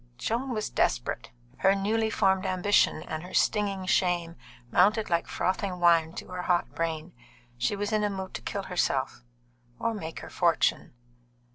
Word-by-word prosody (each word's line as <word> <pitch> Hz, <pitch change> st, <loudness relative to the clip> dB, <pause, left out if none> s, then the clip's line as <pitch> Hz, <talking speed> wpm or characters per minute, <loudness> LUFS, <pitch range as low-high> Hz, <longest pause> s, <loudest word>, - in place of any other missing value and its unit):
Joan 250 Hz, +4 st, -2 dB
was 215 Hz, -, -3 dB
desperate. 120 Hz, -1 st, 0 dB, 0.3 s
Her 195 Hz, +1 st, +4 dB
newly 220 Hz, +3 st, 0 dB
formed 190 Hz, -3 st, +2 dB
ambition 185 Hz, -3 st, +2 dB
and 155 Hz, 0 st, -5 dB
her 180 Hz, +2 st, -8 dB
stinging 200 Hz, -3 st, +1 dB
shame 175 Hz, -2 st, +1 dB, 0.4 s
mounted 210 Hz, +2 st, +3 dB
like 170 Hz, 0 st, +1 dB
frothing 185 Hz, 0 st, -1 dB
wine 165 Hz, -2 st, +4 dB
to -, -, -8 dB
her 180 Hz, 0 st, -4 dB
hot 175 Hz, -1 st, 0 dB
brain. 165 Hz, 0 st, -3 dB, 0.4 s
She 120 Hz, +11 st, 0 dB
was 205 Hz, +1 st, -3 dB
in 215 Hz, -1 st, +1 dB
a 210 Hz, -, +2 dB
mood 190 Hz, -1 st, -5 dB
to -, -, -5 dB
kill 200 Hz, -, -4 dB
herself 135 Hz, -9 st, -1 dB, 0.5 s
or 230 Hz, -, -1 dB
make 165 Hz, -7 st, -6 dB
her -, -, -9 dB
fortune. 170 Hz, -7 st, +1 dB
185 Hz, 160 wpm, -28 LUFS, 170-205 Hz, 0.5 s, Her